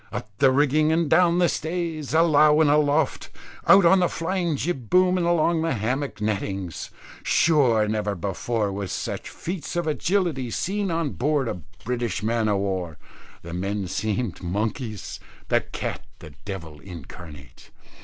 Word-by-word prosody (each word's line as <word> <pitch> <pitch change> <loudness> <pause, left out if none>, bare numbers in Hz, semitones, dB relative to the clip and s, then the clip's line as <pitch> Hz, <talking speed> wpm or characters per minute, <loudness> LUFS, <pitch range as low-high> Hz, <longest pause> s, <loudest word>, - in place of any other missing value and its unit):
Up 105 - -6
the 135 - +6
rigging 150 +3 +3
and 165 0 +2
down 175 +3 +4
the 175 -1 +4
stays, 160 -4 -3
alow 155 -2 +5
and 155 -2 +4
aloft, 150 0 +1 0.4
out 195 -2 +7
on 190 +3 +6
the 180 - +3
flying 175 -1 -1
jib 135 -6 -3
boom 185 0 +4
and 175 -2 0
along 170 -1 +2
the 165 -4 0
hammock 125 +4 -2
nettings. 100 -4 -3 0.3
Sure 125 -10 +3
never 105 -1 -1
before 100 +4 -2
were 100 0 -4
such 95 - -4
feats 175 0 -6
of 175 -1 0
agility 160 -4 0
seen 200 - -2
on 165 -4 -1
board 145 0 0
a 90 - -4 0.2
British 120 -4 -2
Man 115 0 +1
o' 100 - +2
War; 95 -5 -3 0.5
the 85 0 -8
men 100 +3 -2
seemed 105 +1 -2
monkeys, 105 +4 -3 0.3
the - - +3
cat - - -5
the 75 - -12
devil 85 -7 -7
incarnate. 80 -6 -12
130 Hz, 155 wpm, -24 LUFS, 100-165 Hz, 0.5 s, out